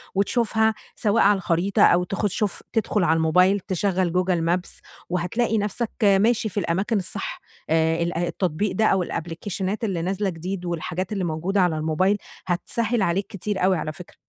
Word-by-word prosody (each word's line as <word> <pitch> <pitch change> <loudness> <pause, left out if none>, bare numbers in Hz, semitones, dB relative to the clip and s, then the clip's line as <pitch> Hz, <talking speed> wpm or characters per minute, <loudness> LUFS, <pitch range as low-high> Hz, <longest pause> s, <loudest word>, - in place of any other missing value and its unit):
وتشوفها 220 +2 +2 0.2
سواء 210 0 +2
على 205 0 +5
الخريطة 180 +2 0
أو 175 0 +5
تخ 195 +3 -1
شوف 205 0 -2
تدخل 215 -3 +1
على 165 -1 +3
الموبايل 180 +5 +4
تشغّل 185 -1 0
google 180 -1 +1 0.2
maps 180 - -9 0.3
وهتلاقي 180 +7 0
نفْسك 210 +3 -2
ماشي 215 +3 +3
في 205 - -2
الأماكن 195 +5 0
الصح، 195 +1 -4 0.3
آآ 160 +1 +2
ال 170 0 -2
التطبيق 175 +2 -1
ده 220 - +2
أو 190 -3 +3
الأبليكيشنات 185 +6 -4
اللي 190 -6 -1
نازلة 195 +3 -1
جديد 180 +2 -5
والحاجات 175 +2 -3
اللي 195 -3 -1
موجودة 175 +4 0
على 175 -3 +2
الموبايل، 160 +6 +1 0.3
هتسهِّل 225 +6 0
عليك 190 +1 +1
كتير 200 -2 -3
أوي 185 -1 +3
على 155 - -3
فكرة. 175 +2 -12
190 Hz, 165 wpm, -24 LUFS, 175-205 Hz, 0.3 s, على